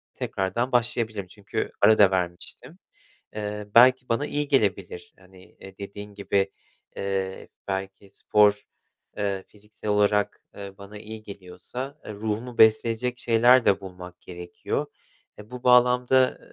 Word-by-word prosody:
tekrardan 105 +7 -2
başlayabilirim, 110 -4 0
çünkü 100 +2 -5
ara 110 - +6
da 100 -2 +6
vermiştim. 90 - -4 0.6
Eee, 105 0 -5
belki 125 +1 +6
bana 115 +5 0
iyi 145 0 -2
gelebilir. 100 -9 -1
Hani, 95 0 -18 0.2
eee, 95 -1 -13
dediğin 100 +1 -8
gibi, 100 -1 -1 0.5
eee, 95 -1 -3 0.2
belki 95 0 -5
spor, 105 +1 +2 0.5
eee, 100 -2 -2
fiziksel 105 0 -10
olarak, 105 0 +1
eee, 100 -1 -8
bana 100 +1 -11
iyi 110 +1 -10
geliyorsa, 100 +9 -9
eee, 105 - -7
ruhumu 110 +3 -4
besleyecek 115 +3 +3
şeyler 120 +2 +4
de 100 0 +3
bulmak 90 -1 -11
gerekiyor. 90 -1 -5 0.5
Eee, 105 +2 -13
bu 125 0 -8
bağlamda, 125 +1 +4
105 Hz, 125 wpm, -25 LUFS, 95-120 Hz, 0.6 s, ara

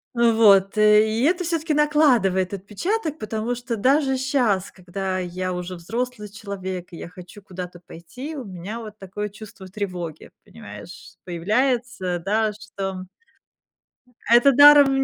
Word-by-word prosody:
Э, 235 -1 +4
вот, 200 -3 +4
и 215 +2 +4
это 355 +4 +2
всё-таки 330 -2 -1
накладывает 245 -12 +2
отпечаток, 310 - -3
потому 220 +2 -3
что 245 0 -4
даже 265 +4 +2
щас, 245 -8 0
когда 185 +1 -4
я 185 0 -3
уже 180 +1 -5
взрослый 225 +4 -5
человек, 190 -3 -6
и - - -8
я 170 - -8
хочу 180 +3 -13
куда-то 180 -2 -8
пойти, 215 - -9
у 255 - -6
меня 190 +4 -7
вот 215 -2 -10
такое 205 +2 -5
чувство 205 -2 -12
тревоги, 180 -5 -6 0.2
понимаешь, 225 -5 -12
появляется, 205 +1 -1
да, 210 +4 0
что 210 -2 -6
м 185 -1 -9 1.2
Это 240 +4 +7
даром 285 -1 +7
210 Hz, 135 wpm, -22 LUFS, 185-250 Hz, 1.2 s, Это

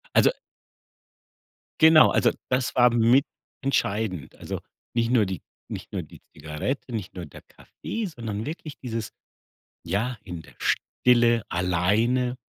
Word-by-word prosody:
Also - - +6 1.5
genau, 160 -1 +8
also, - - +3 0.2
das 125 0 0
war 125 -1 +6
mit 120 +4 +5 0.4
entscheidend. 105 - -1
Also, - - -5 0.3
nicht 115 0 +1
nur 120 -4 +4
die 95 -2 -4 0.3
nicht - - -7
nur - - -3
die - - -15
Zigarette, 80 - -4
nicht 105 -5 -5
nur 90 -2 -5
der 75 - -13
Kaffee, 225 -1 -6
sondern 115 - -5
wirklich 155 -1 -6
dieses 115 -3 -4 0.7
ja, 110 +8 -1
in 85 -2 -7
der 75 -4 -17
Stille 120 -2 +2
alleine. 105 +9 +1
115 Hz, 130 wpm, -25 LUFS, 95-125 Hz, 1.5 s, genau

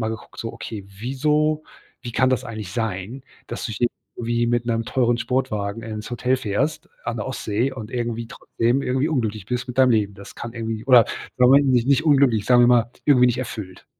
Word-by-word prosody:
mal 110 - -1
geguckt, 110 0 -8
so: 115 - -5
„Okay, 110 -3 -7
wieso 150 +9 0 0.4
wie 120 -3 -6
kann 130 +3 +3
das 130 - 0
eigentlich 110 -5 -7
sein, 110 +3 -3 0.2
dass 120 - -5
du 110 - -5
hier 120 +4 +1 0.3
wie 120 0 0
mit 120 0 +1
'nem 115 -1 0
teuren 120 0 +1
Sportwagen 115 -5 -2
ins 110 0 -6
Hotel 125 +2 +1
fährst, 110 +7 -2 0.2
an 115 - -2
der 110 - -3
Ostsee 120 -1 -1
und 110 -4 -8
irgendwie 120 -2 -3
trotzdem 120 +4 -1
irgendwie 130 +3 0
unglücklich 110 - -2
bist 125 +2 -3
mit 125 - -6
deinem 130 -1 +6
Leben? 105 -3 +1
Das 100 0 -12
kann 115 - -7
irgendwie 115 -1 -4
oder 125 -3 +7 0.3
Moment 135 +3 +6
nicht 125 -1 +3
nicht 140 +3 +3
unglücklich, 135 -8 +4
sagen 125 -1 +6
wir - - +6
mal, 120 -1 +4
irgendwie 125 -4 +5
nicht 120 0 +1
erfüllt.“ 105 -7 -6
120 Hz, 200 wpm, -22 LUFS, 110-130 Hz, 0.4 s, oder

